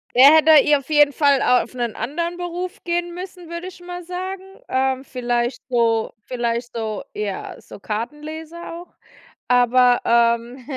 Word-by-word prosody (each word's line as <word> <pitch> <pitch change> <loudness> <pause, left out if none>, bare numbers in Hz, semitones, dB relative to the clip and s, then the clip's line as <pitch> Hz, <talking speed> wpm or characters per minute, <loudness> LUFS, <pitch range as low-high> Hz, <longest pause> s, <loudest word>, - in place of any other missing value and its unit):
Der 275 +5 +8
hätte 315 0 +6
hier 295 0 +5
auf 275 - -17
jeden 295 -2 +4
Fall 280 -2 +3
auf 250 +1 +2
'nen 240 -3 -3
anderen 335 +9 -3
Beruf 355 +1 -5
gehen 345 0 -2
müssen, 360 -1 -9
würde 340 +2 -6
ich 370 - -11
mal 355 0 -8
sagen. 370 +2 -5 0.3
Ähm, 265 0 0
vielleicht 240 -1 -2
so 230 -2 +1
vielleicht 240 0 -3
so 220 -2 -3
ja, 205 -2 -5
so - - -13
Kartenleser 305 +11 -6
auch. 345 +1 -11 0.5
Aber, 245 0 +4
ähm, 235 +2 +1
275 Hz, 150 wpm, -21 LUFS, 240-340 Hz, 0.5 s, Der